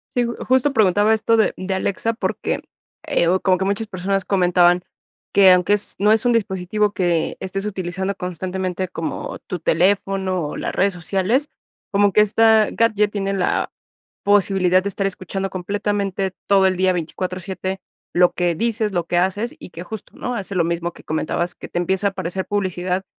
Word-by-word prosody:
Sí, 245 - +3
ju 235 - -3
justo 260 +2 +3
preguntaba 210 -1 +3
esto 225 +1 +2
de, 220 - +2
mm, 185 - -6
de 190 - -1
Alexa 200 +4 -1
porque, 225 - -2 0.5
eh, 280 - +2
o 185 +2 +2
como 185 -1 +2
que 190 - -1
muchas 200 +3 -1
personas 195 0 -1
comentaban 180 -2 +3 0.5
que 195 -1 +7
aunque 180 +2 +4
es 205 0 0
no 210 +2 +4
es 220 +2 +2
un 245 - +3
dispositivo 205 -1 0
que, 175 -4 0
eh, - - -11
estés 195 +2 -4
utilizando 190 0 -3
constantemente 185 +1 -3
como 165 -2 -5
tu 180 - -3
teléfono 185 -1 +1
o - - -6
las - - -3
redes 200 +1 +2
sociales, 195 - 0 0.4
como 200 -1 +3
que - - +5
esta 220 0 +4
gadget 210 -2 +2
tiene 195 -1 -2
la 190 -2 0 0.5
posibilidad 190 -2 +3
de - - 0
estar 195 0 -3
escuchando 195 +1 -4
completamente 195 0 -2
todo 195 -1 +4
el 185 - -1
día 185 0 +3
24/7 185 +2 -4 0.3
lo 180 0 +5
que 175 -1 0
dices, 220 +2 -1
lo 175 -2 -1
que 175 - 0
haces 200 +6 -1
y - - -11
que 170 - -8
justo, 215 +3 -9
¿no? 250 0 -3
Hace 200 -2 -5
lo 175 - +3
mismo 170 +1 -2
que - - -15
comentabas, 170 +3 -2
que - - -9
te 175 - -2
empieza 190 +3 0
a - - -3
aparecer 190 0 -3
publicidad 185 -2 -1
190 Hz, 185 wpm, -21 LUFS, 180-205 Hz, 0.5 s, que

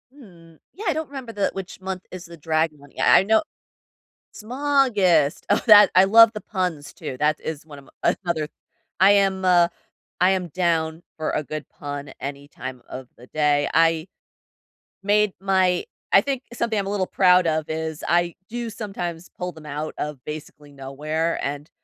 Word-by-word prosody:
Mm. 170 - -17 0.2
Yeah, 420 +5 -9
I 335 - +3
don't 315 0 -3
remember 265 -4 -8
the 200 -2 0
which 190 -1 -7
month 190 -1 -5
is 185 -1 -8
the 170 -1 -12
dragon 155 0 0
one, 140 -1 -17
i - - +7
I - - +1
know 220 +7 +3 0.9
Smaugust. 220 - +2
Oh, 205 - +3
that 210 -1 +9
I 185 - +8
love 225 +3 +7
the 210 - -6
puns 180 -7 -3
too, 145 -6 -7
that 150 0 +1
is 155 -1 -6
one 145 -2 -11
of 135 - -18
m - - +3
another 160 -3 -1 0.5
I 195 +2 +7
am, 195 -2 +2
uh 175 -2 +5 0.5
I 180 +1 +5
am 185 -2 -1
down 165 -1 -1
for 155 - -2
a - - -1
good 155 0 -6
pun 145 -1 -7
any 140 +1 -6
time 130 -2 -8
of 130 -1 -8
the 120 - -15
day. 145 -1 +1
I 165 +1 +2 0.9
made 210 0 +2
my 190 -2 +2 0.3
I 195 - +9
think 270 +3 -3
something 230 -2 -1
I'm 195 - -2
a - - -3
little 195 -2 0
proud 180 -2 +4
of 155 -1 0
is 160 -1 -4
I 175 0 +1
do 235 0 -4
sometimes 180 -6 -6
pull 180 -1 -4
them 160 -1 -14
out 150 +1 -5
of 150 -4 -5
basically 150 -1 -9
nowhere, 150 +4 -3
and 145 +2 -4
170 Hz, 180 wpm, -23 LUFS, 150-195 Hz, 0.9 s, that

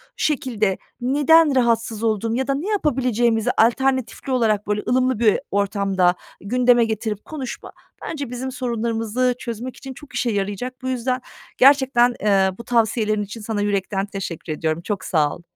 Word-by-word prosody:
şekilde 225 -9 0 0.2
neden 290 +4 +4
rahatsız 230 -3 +1
oldum 225 0 0
ya 265 +1 -1
da 275 - +1
ne 305 +8 -4
yapabileceğimizi 245 - +1
alternatifli 260 +3 +1
olarak, 220 -5 +1
böyle, 210 0 0
ılımlı 255 -1 +2
bir 220 -3 +3
ortamda 195 -2 +1 0.3
gündeme 245 +3 +3
getirip 215 -1 -3
konuşma, 275 -6 -7 0.3
bence 285 -5 -5
bizim 250 +2 -4
sorunlarımızı 235 -1 -1
çözmek 240 +2 -6
için 270 -1 -8
çok 280 -1 -14
işe 240 -1 0
yarayacak. 205 +5 -3
Bu 260 - -5
yüzden 255 0 -1 0.4
gerçekten, 260 -3 +5
eee, 195 -2 +3
bu 235 - -8
tavsiyelerin 220 -2 +1
için 210 +3 -8
sana 210 -1 -2
yürekten 200 -1 -1
teşekkür 180 -5 -5
ediyorum. 155 +1 -2
Çok 195 +1 -4
sağ 155 -5 +1
ol. - - -14
230 Hz, 150 wpm, -21 LUFS, 205-255 Hz, 0.4 s, gerçekten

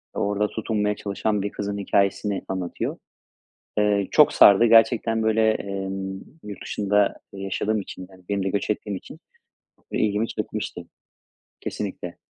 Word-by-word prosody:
ve - - -2
orada 105 +1 +1
tutunmaya 105 -2 -1
çalışan 105 +1 -1
bir 100 +1 -3
kızın 100 0 -4
hikâyesini 100 0 +1
anlatıyor. 95 -2 -3 0.8
Eee, 105 -1 +2
çok - - +6
sardı 100 +3 +7
gerçekten, 115 0 +4
böyle, 110 0 +3
emm, 95 -2 -4 0.2
yurt 105 -1 -8
dışında 105 0 +1 0.2
yaşadığım 100 +2 -1
için, 95 -1 -9
yani 95 -1 -17
benim 100 -1 0
de 95 - 0
göç 100 +1 -2
ettiğim 105 -1 -2
için 125 - -10 0.7
ilgimi 105 +1 0
çekmişti. - - -5 0.8
Kesinlikle. 95 -4 -5
100 Hz, 130 wpm, -24 LUFS, 95-105 Hz, 0.8 s, sardı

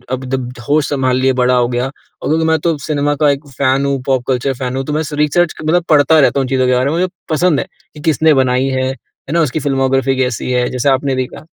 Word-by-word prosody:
अब 130 +1 -8
जब 130 -2 -2 0.2
होश 150 0 +2
संभाल 130 -3 0
लिए, 130 0 +2
बड़ा 125 0 +2
हो 120 -1 +2
गया 125 0 -1
और 135 - -10
क्योंकि 160 +1 +1
मैं 160 0 +3
तो 165 -3 0
सिनेमा 145 -1 0
का 150 - +5
एक 140 +1 -5
फैन 135 +1 0
हूँ 140 -1 -1
पॉप 130 -2 +1
कल्चर 130 +1 0
फैन 125 +1 -4
हूँ 135 - -2
तो 150 - -3
मैं 155 +1 0
सु 150 -1 -6
रिसर्च 150 +3 +1
मतलब 170 +3 +2
पढ़ता 155 +1 +5
रहता 140 -1 +3
हूँ 135 - -2
चीज़ों 130 -1 +1
के 125 - +3
बारे 125 +1 +1
में, 165 - -1
मुझे 185 - +1 0.2
पसंद 160 -1 +2
है - - -4 0.3
कि 150 - -10
किसने 160 0 +3
बनाई 130 -1 +2
है, 130 -1 -1
है 135 +1 -11
ना? 170 - +3
उसकी 155 -1 -1
फ़िल्मोग्राफ़ी 135 -1 0
कैसी 125 -1 -1
है, 125 -1 +1
जैसे 130 +2 0
आपने 135 0 +1
देखा। 130 +3 -5
135 Hz, 255 wpm, -15 LUFS, 130-150 Hz, 0.3 s, का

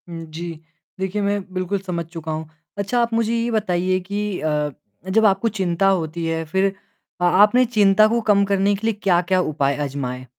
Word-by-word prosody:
हुँ, 165 -1 -7
जी। 165 +1 -7 0.4
देखिए 190 +2 -2
मैं 200 0 0
बिल्कुल 185 +2 -2
समझ 180 -3 -4
चुका 165 -1 -7
हूँ। 155 0 -4 0.3
अच्छा 200 +5 0
आप 235 0 -1
मुझे 230 0 +1
यह 230 +1 -1
बताइए 185 -4 0
कि 200 +1 -3
अ, 150 -1 0 0.4
जब 220 +3 +3
आपको 200 +3 +3
चिंता 185 +1 +1
होती 170 -3 0
है 165 0 -1
फिर 190 +4 +1 0.5
आ 175 - +4
आपने 245 +5 +5
चिंता 215 -2 +4
को 235 +2 +1
कम 200 -1 +5
करने 200 0 +2
के 215 +3 -3
लिए 225 - +2
क्या-क्या 180 0 +2
उपाय 140 -4 0
आज़माए? 130 -2 -4
190 Hz, 185 wpm, -21 LUFS, 165-205 Hz, 0.5 s, आपने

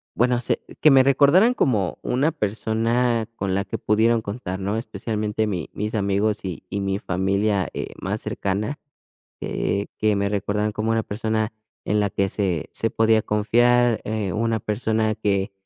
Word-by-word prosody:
bueno, 120 0 +2
sé - - -1 0.2
que 155 - +7
me 135 -1 +7
recordaran 145 - +5
como 105 - 0
una 140 +6 +1
persona 115 0 0
con 95 -1 -1
la 100 - 0
que - - -4
pudieron 110 +2 +2
contar, 100 -3 -5
¿no?, 100 +2 -2
especialmente 110 -2 -2
mi 90 -6 -3
mis 105 +2 -3
amigos 100 +1 0
y 90 -4 -5
y 100 - -2
mi 95 0 -1
familia, 100 +1 0
eh, - - -5
más - - -3
cercana, 105 +9 -2 0.6
eh, 100 +1 -1
que 110 -1 +2
me 100 0 0
recordaran 105 +1 -1
como 110 +1 -1
una 115 0 +1
persona 110 +1 -2 0.3
en 105 - +1
la 105 -1 +1
que 100 0 0
se 90 -7 -1
se 115 - -1
podía 110 -1 +3
confiar, 120 +3 +3
eh, 105 -3 -2
una 115 0 0
persona 110 +1 0
que 100 -2 0
110 Hz, 165 wpm, -23 LUFS, 100-115 Hz, 0.6 s, que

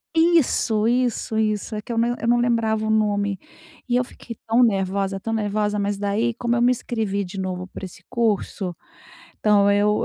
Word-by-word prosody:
Isso, 310 -10 +3
isso, 240 -2 0
isso. 215 0 -1
É 210 - -3
que 225 - -8
eu 230 - -2
não 240 +1 +2
eu 230 - -3
não 240 +1 +4
lembrava 225 -2 +1
o - - -1
nome 205 -2 +1 0.5
e 245 - +1
eu 250 - +3
fiquei 235 -1 -10
tão 230 +2 +3
nervosa, 195 -3 +1
tão 225 - -4
nervosa, 210 -1 0
mas 200 0 -1
daí 210 +4 0
como 240 +1 -1
eu 235 - +1
me 245 +1 +5
inscrevi 220 -5 -2
de 190 +1 -7
novo 185 -1 -3
para 190 - -8
esse 185 - -12
curso, 205 -5 -1 0.6
então 205 -1 +4
eu, 205 +1 +2
215 Hz, 190 wpm, -23 LUFS, 200-235 Hz, 0.6 s, me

